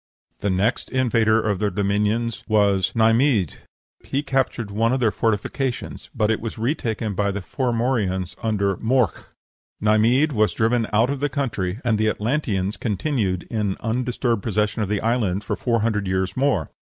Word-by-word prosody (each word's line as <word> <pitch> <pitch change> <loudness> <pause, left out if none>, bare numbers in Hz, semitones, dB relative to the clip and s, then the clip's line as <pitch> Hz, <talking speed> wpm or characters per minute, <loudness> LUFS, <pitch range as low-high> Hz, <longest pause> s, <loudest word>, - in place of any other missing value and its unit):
The 100 - -1
next 100 +6 0
invader 115 -4 +2
of 105 -4 -1
their 105 - +1
dominions 105 +4 0
was 100 -3 +2
Neimhidh; 115 - +3 0.5
he 140 +2 -2
captured 130 -6 -1
one 115 +4 +1
of 130 - +1
their 115 -4 +2
fortifications, 115 +5 -2
but 110 -2 +2
it 110 - -1
was 115 0 -5
retaken 115 -3 -2
by 100 +1 0
the 100 +1 -2
Formorians 115 -5 -1
under 100 -4 0
"Morc." 125 0 +1 0.5
Neimhidh 115 +8 +3
was 110 -5 +2
driven 115 0 +1
out 115 +5 +3
of 140 - -3
the 145 +1 0
country, 110 -9 -2
and 110 -3 +2
the 110 0 +3
Atlanteans 105 -5 -1
continued 100 - -1
in 105 -4 -1
undisturbed 120 -1 -1
possession 105 +1 0
of 105 - -1
the 105 -1 0
island 110 -4 0
for - - -2
four 115 -3 0
hundred 105 -3 0
years 95 0 -1
more. 130 - +1
110 Hz, 160 wpm, -22 LUFS, 100-120 Hz, 0.5 s, Neimhidh